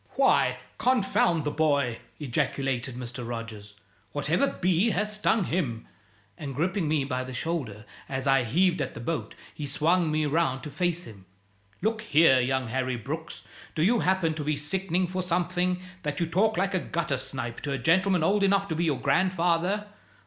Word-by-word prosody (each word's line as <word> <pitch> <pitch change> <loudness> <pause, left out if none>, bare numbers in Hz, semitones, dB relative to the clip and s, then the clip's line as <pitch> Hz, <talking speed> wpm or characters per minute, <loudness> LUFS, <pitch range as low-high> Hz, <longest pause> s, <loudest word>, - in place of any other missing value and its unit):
"Why, - - +3 0.2
confound 195 - +2
the 150 - -1
boy!" 140 -7 +1 0.2
ejaculated 135 -1 -1
Mr. 125 0 -6
Rogers. 110 -3 -7 0.4
"What 145 +1 -3
ever 230 +12 +3
bee 185 0 +1
has 210 +2 0
stung 210 0 +2
him?" 135 -11 -2 0.5
And 140 -3 -5
gripping 175 +3 0
me 150 -2 +1
by 130 -1 -2
the 130 0 -7
shoulder 125 -10 -3 0.2
as 135 0 -2
I 135 -2 +4
heaved 175 +9 +2
at - - -3
the - - -6
boat, 155 +8 -3 0.2
he 150 - -5
swung 165 +4 +2
me 155 0 +1
round 145 -3 0
to 150 - -6
face 175 +1 0
him. 100 - -13 0.6
"Look 220 +1 0
here, 155 - +5
young 130 -1 0
Harry 130 +1 -1
Brooks! 150 +8 -6 0.3
Do 155 - +1
you 230 +6 +4
happen 185 -4 +2
to 155 -1 -4
be 150 +1 0
sickening 180 +4 -1
for 185 +1 -3
something, 180 +1 0 0.2
that 150 -3 -3
you 170 - +1
talk 200 +7 +1
like 195 +2 +1
a 185 - +2
gutter 170 -4 -2
snipe 125 -2 -5
to 145 - -3
a 135 - 0
gentleman 180 +5 +3
old 200 +5 +3
enough 195 0 +3
to 160 - -1
be 170 +2 0
your 145 -5 0
grandfather? 180 +5 +1
160 Hz, 180 wpm, -27 LUFS, 135-185 Hz, 0.6 s, here